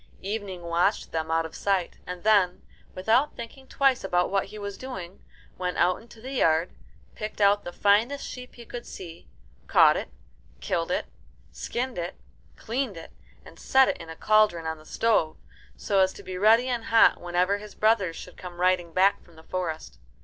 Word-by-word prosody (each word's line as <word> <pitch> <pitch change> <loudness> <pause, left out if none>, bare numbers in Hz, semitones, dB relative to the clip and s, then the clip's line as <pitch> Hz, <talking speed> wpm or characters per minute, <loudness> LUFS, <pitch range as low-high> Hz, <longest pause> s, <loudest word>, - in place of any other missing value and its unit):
Evening 195 -3 -4
watched 170 +1 0
them 160 -1 -2
out 165 0 +1
of 160 - -8
sight, 195 -3 -1
and 180 -1 -6
then, 200 -4 +3 0.3
without 225 +10 +2
thinking 260 +3 -9
twice 270 -2 +2
about 180 -2 +1
what 195 -1 +1
he 210 +2 -11
was 200 -1 -5
doing, 190 -8 -8 0.4
went 180 -1 -2
out 180 +1 +2
into 230 0 -16
the 255 +4 -8
yard, 165 -9 +2 0.4
picked 215 0 -6
out 205 0 +4
the 175 - -5
finest 220 +10 +2
sheep 250 0 -9
he 235 - -11
could 240 +1 -8
see, 170 -2 -10 0.4
caught - - +6
it, - - -4 0.5
killed - - -2
it, - - -1 0.5
skinned 240 - -4
it, 170 0 -4 0.4
cleaned 235 -4 -3
it, 165 - -10 0.3
and - - -14
set 265 0 +4
it - - -1
in 165 - -10
a 160 - -7
cauldron 210 -4 +3
on 160 -1 -3
the 155 - -17
stove 215 -9 +1 0.4
so 195 - 0
as 190 0 +4
to - - -12
be 185 - -6
ready 220 +6 +4
and 240 -3 -2
hot 225 0 +5
whenever 180 +3 +1
his 210 0 -11
brothers 210 -6 +2
should 180 - -10
come 175 -1 -9
riding 180 -2 +1
back 190 +3 +3
from 170 - -21
the 160 - -15
forest. 165 -3 -5
195 Hz, 185 wpm, -26 LUFS, 175-225 Hz, 0.5 s, caught